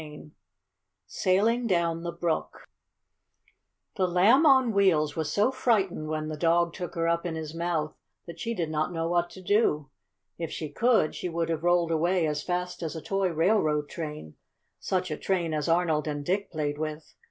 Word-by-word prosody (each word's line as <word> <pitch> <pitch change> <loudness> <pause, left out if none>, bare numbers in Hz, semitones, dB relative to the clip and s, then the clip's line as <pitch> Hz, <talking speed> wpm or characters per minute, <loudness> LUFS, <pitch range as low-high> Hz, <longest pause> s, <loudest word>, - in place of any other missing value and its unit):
CHAPTER 150 -1 -10
VIII 150 - -17 0.7
SAILING 215 - +1
DOWN 170 -4 +1
THE 170 0 -4
BROOK 170 -1 -3 1.3
The 185 -2 +2
Lamb 210 - +5
on 260 -4 +5
Wheels 160 -7 +3
was 155 -2 -2
so 210 +9 +2
frightened 205 -11 0
when 155 0 -3
the 155 - -4
dog 170 +1 +2
took 180 -2 -6
her 165 0 0
up 170 0 +1
in 170 -2 -3
his 160 -1 -6
mouth 165 -2 -2 0.3
that 170 -1 -10
she 230 0 -3
did 165 -5 -2
not 155 +2 -1
know 165 -1 -2
what 175 0 +1
to 185 - -12
do. 175 -9 +1 0.5
If 165 -2 -3
she 155 - -5
could, 225 -3 +2
she 180 - -4
would 165 0 -2
have 160 -1 -1
rolled 175 -1 +2
away 170 +2 +2
as 150 -1 -1
fast 180 +1 -3
as 165 -1 -4
a 160 - -5
toy 195 -1 0
railroad 160 -4 +1
train, 150 - -7 0.4
such 185 -2 -2
a 155 - -2
train 175 -4 -1
as 150 +1 -1
Arnold 165 -3 +1
and 145 -1 -3
Dick 200 +4 -1
played 150 -3 -2
with. 155 0 -5
170 Hz, 185 wpm, -27 LUFS, 155-185 Hz, 1.3 s, Lamb